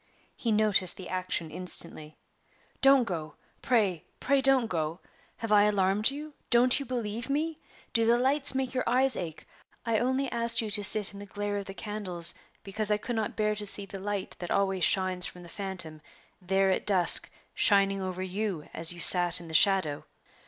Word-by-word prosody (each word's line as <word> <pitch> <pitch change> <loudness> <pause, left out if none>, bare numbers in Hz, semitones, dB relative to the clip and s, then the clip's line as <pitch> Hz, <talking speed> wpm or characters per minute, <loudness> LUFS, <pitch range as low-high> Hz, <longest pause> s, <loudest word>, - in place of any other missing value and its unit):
He 230 - -3
noticed 210 -4 +3
the 185 - -9
action 185 -3 -3
instantly. 155 -4 +3 0.6
"Don't 270 -1 +5
go! 165 -8 -6 0.3
pray 205 - 0 0.2
pray 275 0 +1
don't 265 -2 +3
go! 165 -4 -4 0.4
Have 225 -2 -6
I 205 -1 +5
alarmed 205 +1 +1
you? 295 +2 -8 0.2
Don't 245 +3 +3
you 280 - -7
believe 230 -1 -5
me? 310 +3 -2 0.3
Do 230 -1 +1
the 235 +1 +4
lights 270 +2 +4
make 265 -1 -2
your 255 - -1
eyes 260 +2 +1
ache? 165 -3 -7 0.4
I 225 -2 0
only 260 +3 -1
asked 235 0 -1
you 220 -2 -2
to 205 0 +1
sit 210 0 +2
in 200 - -11
the 205 - -10
glare 205 0 -4
of 200 - -9
the 195 - -9
candles 200 -6 -5 0.3
because 210 +2 -3
I 210 - +1
could 240 +3 -5
not 220 -1 -3
bear 215 -1 0
to 210 0 -4
see 200 0 +1
the 195 0 -9
light 200 0 -5
that 175 - -7
always 195 -2 -1
shines 185 -2 +1
from 180 - -12
the 170 - -13
phantom 185 -6 -7 0.4
there 190 +1 +1
at 185 - -3
dusk 185 -4 +5 0.2
shining 195 -1 +2
over 185 0 -5
you 190 -3 -4
as 165 +1 +2
you 175 - -9
sat 175 0 +5
in 170 -1 -12
the - - -9
shadow. 170 -4 +3
205 Hz, 190 wpm, -27 LUFS, 185-230 Hz, 0.6 s, Don't